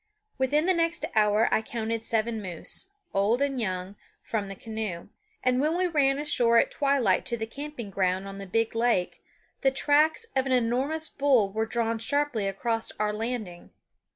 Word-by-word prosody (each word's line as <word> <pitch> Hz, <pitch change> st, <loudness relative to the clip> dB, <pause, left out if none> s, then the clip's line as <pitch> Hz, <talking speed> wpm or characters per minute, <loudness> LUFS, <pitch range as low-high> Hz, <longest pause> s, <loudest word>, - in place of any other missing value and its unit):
Within 290 Hz, +4 st, +2 dB
the 375 Hz, -, +4 dB
next 335 Hz, 0 st, 0 dB
hour 215 Hz, +1 st, +4 dB
I -, -, +3 dB
counted 225 Hz, 0 st, -3 dB
seven 225 Hz, 0 st, -1 dB
moose, 185 Hz, -, -5 dB, 0.2 s
old 205 Hz, +5 st, +2 dB
and 275 Hz, -3 st, 0 dB
young, 185 Hz, -1 st, -3 dB, 0.3 s
from 210 Hz, -3 st, -2 dB
the 195 Hz, -, -7 dB
canoe; 215 Hz, -5 st, -5 dB, 0.3 s
and 255 Hz, 0 st, +2 dB
when 310 Hz, +4 st, +1 dB
we 365 Hz, -, +2 dB
ran 280 Hz, -5 st, +2 dB
ashore 245 Hz, -6 st, +3 dB
at -, -, +3 dB
twilight 275 Hz, -9 st, +2 dB
to 240 Hz, -2 st, -1 dB
the 220 Hz, -, -3 dB
camping 260 Hz, -3 st, -7 dB
ground 190 Hz, 0 st, 0 dB
on 195 Hz, 0 st, -8 dB
the 195 Hz, -, -7 dB
big 225 Hz, +4 st, 0 dB
lake, 230 Hz, -6 st, 0 dB, 0.4 s
the 270 Hz, -, +4 dB
tracks 295 Hz, -, +3 dB
of 265 Hz, 0 st, +1 dB
an 260 Hz, -, +1 dB
enormous 260 Hz, +7 st, +1 dB
bull 250 Hz, -9 st, +2 dB
were 220 Hz, +1 st, -1 dB
drawn 230 Hz, -1 st, -1 dB
sharply 255 Hz, -3 st, 0 dB
across 225 Hz, +3 st, -2 dB
our 210 Hz, 0 st, -1 dB
landing. 215 Hz, -5 st, -5 dB
230 Hz, 175 wpm, -27 LUFS, 210-275 Hz, 0.4 s, the